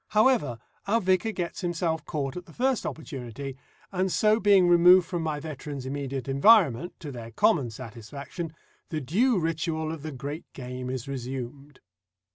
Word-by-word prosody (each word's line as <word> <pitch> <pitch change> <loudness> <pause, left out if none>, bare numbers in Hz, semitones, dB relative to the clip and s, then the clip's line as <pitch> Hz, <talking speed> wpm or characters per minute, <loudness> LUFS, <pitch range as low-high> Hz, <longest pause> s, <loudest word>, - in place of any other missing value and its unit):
However, 215 - +4 0.3
our 225 +3 +3
vicar 190 +2 +2
gets 175 -5 -4
himself 165 -3 -1
caught 140 -3 -3
at 180 -1 -7
the 165 - -14
first 260 0 +1
opportunity, 135 -3 -6 0.4
and 190 0 0
so 215 +3 +3
being 195 -3 +5
removed 175 +1 +7
from 175 -2 -2
my 155 -2 -2
veteran's 145 -3 -6
immediate 135 0 -4
environment, 150 - +4
to 150 -4 -6
their 115 -3 -8
common 125 +3 +2
satisfaction, 130 - -7 0.4
the 155 - -2
due 205 - +2
ritual 160 -1 -1
of 160 -2 -6
the 155 +1 -5
great 145 +4 -6
game 125 -1 -6
is 130 -1 -4
resumed. 135 +1 -6
155 Hz, 155 wpm, -27 LUFS, 135-180 Hz, 0.4 s, removed